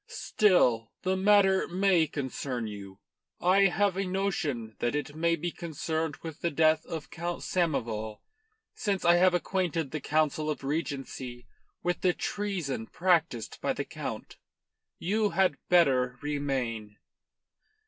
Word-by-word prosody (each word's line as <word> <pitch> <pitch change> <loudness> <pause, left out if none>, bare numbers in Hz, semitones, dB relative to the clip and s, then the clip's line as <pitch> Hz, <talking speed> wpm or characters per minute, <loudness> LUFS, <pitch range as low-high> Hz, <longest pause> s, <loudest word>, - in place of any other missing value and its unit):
"Still, 125 - +2
the 185 0 +1
matter 195 -1 +4
may 180 -2 +3
concern 130 -4 -4
you. 100 -2 -8 0.4
I 195 +2 +5
have 195 +1 +1
a 195 - +1
notion 175 - -2
that 120 +4 0
it 145 0 -3
may 170 +1 +2
be 175 +2 -3
concerned 160 -2 -3
with 160 -2 -7
the 170 - +1
death 155 0 +3
of 160 -2 -6
Count 170 +1 -4
Samoval, 115 -11 -1 0.5
since 195 -4 -2
I 170 0 +6
have 180 0 +5
acquainted 175 -5 -1
the 155 - -3
Council 155 0 +1
of 150 -3 -3
Regency 135 -4 -4 0.4
with 175 0 -1
the 180 -1 +3
treason 175 - -3
practised 165 -10 0
by - - +1
the - - -4
Count. - - -6 0.6
You 210 +4 +1
had 185 -7 +3
better 130 -8 +4
remain." 130 -8 -2
160 Hz, 135 wpm, -29 LUFS, 135-180 Hz, 0.6 s, I